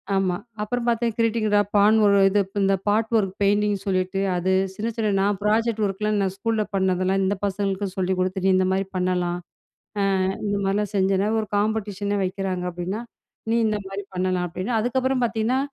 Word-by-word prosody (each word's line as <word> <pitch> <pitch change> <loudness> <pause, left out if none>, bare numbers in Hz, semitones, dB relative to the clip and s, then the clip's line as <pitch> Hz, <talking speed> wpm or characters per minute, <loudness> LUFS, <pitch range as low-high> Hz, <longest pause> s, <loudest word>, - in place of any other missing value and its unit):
ஆமா. 190 -2 +1 0.3
அப்பறம் 240 +3 -2
பார்த்தேன் 235 -1 +1
கிரீட்டிங் 230 -1 +1
இதா 205 0 +4 0.2
பான் 205 +2 +5
ஒரு 200 -1 +5
இது 205 +1 +2 0.2
இந்த 195 0 +3
பார்ட் 220 +2 +1
ஒர்க் 195 -3 0
பெயிண்டிங்னு 205 0 +2
சொல்லிட்டு 190 0 0 0.2
அது. 185 +2 +1 0.2
சின்ன 220 +4 -3
சின்ன 215 -2 0
நான் 200 0 +1
ப்ராஜெக்ட் 220 +1 +1
ஒர்க்லாம் 210 +2 -1
நான் 190 -1 0
ஸ்கூல 220 +1 0
பண்ணதெல்லாம் 190 0 +1
இந்த 200 +2 +1
பசங்களுக்கு 200 0 -1
சொல்லிக் 185 0 0
குடுத்துட்டு, 185 +1 -1
நீ - - +5
இந்தமாரி 190 +1 +1
பண்ணலாம் 180 -1 0 0.9
ஆ, - - +1 0.2
இந்த 205 0 0
மாரிலாம் 205 +2 0
செஞ்சேனா 195 +1 +2
ஒரு 215 - -5
காம்படிஷன் 205 -1 -1
ஏ - - 0
வைக்கிறாங்க. 185 -1 -3
அப்பிடின்னா 180 +5 -4 0.5
நீ - - +2
இந்தமாரி 200 -2 -3
பண்ணலாம் 185 0 0
அப்பிடின்னா, 190 +7 -2
அதுக்கப்பறம் 260 +2 0
பார்த்தீங்கன்னா, 230 +2 0
200 Hz, 170 wpm, -23 LUFS, 190-215 Hz, 0.9 s, பான்